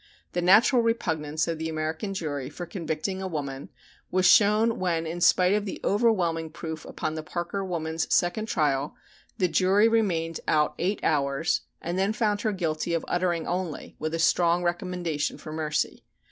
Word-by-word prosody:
The 175 - -1
natural 215 +8 +5
repugnance 160 -9 -1
of 165 -1 -2
the 160 0 -2
American 160 +5 -3
jury 145 -7 -3
for 175 +4 -7
convicting 170 +2 -3
a 190 - -3
woman 140 -5 -5 0.4
was 185 0 +1
shown 210 +4 +5
when 170 -3 0
in 170 +2 -5
spite 180 +2 +5
of 210 0 0
the 195 - -5
overwhelming 180 -7 +1
proof 160 0 -7
upon 155 - -4
the 155 - -4
Parker 175 +5 -4
woman's 160 -3 -3
second 215 +5 +1
trial 145 -6 0 0.4
the 185 -4 +2
jury 190 +5 +4
remained 175 -8 0
out 150 -1 +2
eight 195 +4 -1
hours 140 0 +1 0.2
and 175 +2 -2
then 195 +3 +1
found 210 -2 0
her 215 - 0
guilty 170 -3 -1
of 165 - -2
"uttering 175 -2 0
only," 175 -3 -4
with 155 +1 -2
a - - -1
strong 170 +1 +3
recommendation 175 -3 -2
for 155 - -9
mercy. 155 -1 -2
170 Hz, 170 wpm, -26 LUFS, 160-190 Hz, 0.4 s, natural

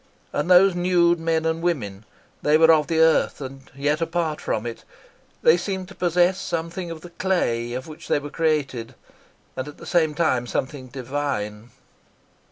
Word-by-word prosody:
And 150 +4 -1
those 185 +1 +7
nude 175 -1 +3
men 165 0 0
and 160 0 0
women. 110 - -2 0.4
They 150 +1 +4
were 160 0 +7
of 150 -2 +2
the 165 - 0
earth, 160 0 +3
and 135 -1 -9
yet 145 +3 0
apart 165 -2 -1
from 110 - -2
it. 115 -1 -6 0.6
They 160 - +6
seemed 190 0 -4
to - - -11
possess 180 +1 +2
something 170 +2 -4
of 165 -1 -7
the 175 - -11
clay 120 -12 0
of 130 +3 -5
which 155 -1 -11
they - - +2
were 145 0 -6
created, 145 -8 -1 0.6
and 130 - -4
at 150 - -10
the - - -11
same 160 -4 +2
time 130 -7 +1
something 130 +1 -3
divine. 125 -5 -4
160 Hz, 175 wpm, -23 LUFS, 135-170 Hz, 0.6 s, those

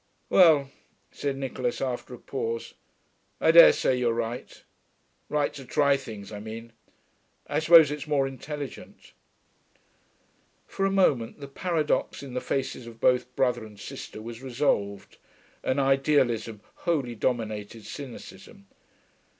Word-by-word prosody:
'Well,' 155 -7 +6 0.4
said 140 -1 -3
Nicholas, 130 -2 -3
after 125 -1 -4
a - - -13
pause, 115 -2 -4 0.7
'I 160 - +5
dare 170 0 +10
say 130 - +1
you're 120 -2 +1
right. 115 +1 -5 0.7
Right 150 -1 0
to 140 - -9
try 140 +2 +3
things, 110 -6 -8
I 105 - -6
mean. 115 +2 -8 0.7
I 145 +1 -1
suppose 160 -2 +7
it's 150 +1 -5
more 145 -2 +2
intelligent.' 140 +2 -8 1.5
For 195 - -1
a - - -1
moment 145 -12 +2
the 140 - -8
paradox 155 0 -1
in 135 -3 -8
the 125 - -2
faces 130 -3 -3
of 115 -1 -12
both 125 +1 +2
brother 125 -3 +1
and 105 -2 -12
sister 110 - -8
was 115 +1 -8
resolved, 100 -6 -1 0.5
and 130 +2 0
idealism 130 -5 +1 0.2
wholly 145 -9 -1
dominated 110 -2 -3
cynicism. 130 -6 -10
130 Hz, 130 wpm, -27 LUFS, 115-145 Hz, 1.5 s, dare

